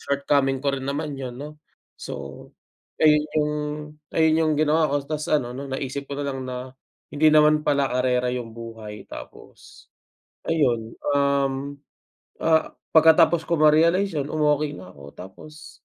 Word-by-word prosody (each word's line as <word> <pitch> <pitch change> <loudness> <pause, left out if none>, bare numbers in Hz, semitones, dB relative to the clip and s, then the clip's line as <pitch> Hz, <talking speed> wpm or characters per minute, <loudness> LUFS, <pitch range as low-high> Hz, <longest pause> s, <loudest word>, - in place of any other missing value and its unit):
shortcoming 140 -1 0
ko 140 -1 +1
rin 130 - -7
naman 145 +1 -3
yun, 130 -2 -6
'no. 150 +2 -9 0.4
So - - -8 0.5
ayun, 150 -1 +5
yung 150 -1 +1 0.6
ayun 160 0 +3
yung 155 - +2
ginawa 155 +1 +2
ko 145 - 0
tapos 150 0 -4
ano 130 -5 +1
'no, 140 +1 -6
naisip 135 +1 -4
ko - - -3
na - - -4
lang 135 -1 -5
na, 125 0 -6 0.4
hindi 155 +2 +4
naman 150 0 +5
pala 140 -1 +2
karera 125 0 +1
yung 120 -2 -5
buhay. 115 -2 -9
Tapos, - - -13 0.6
ayun, 120 -9 +1 0.2
um, 140 0 0 0.7
ah, 160 -1 +2 0.2
pagkatapos 160 +1 +6
ko 170 - 0
ma-realize 165 +5 +4
yun 140 - -2
umokey 150 -1 +1
na 90 0 -11
ako. 70 -4 -14
Tapos, 150 +12 -12
140 Hz, 145 wpm, -23 LUFS, 130-155 Hz, 0.7 s, pagkatapos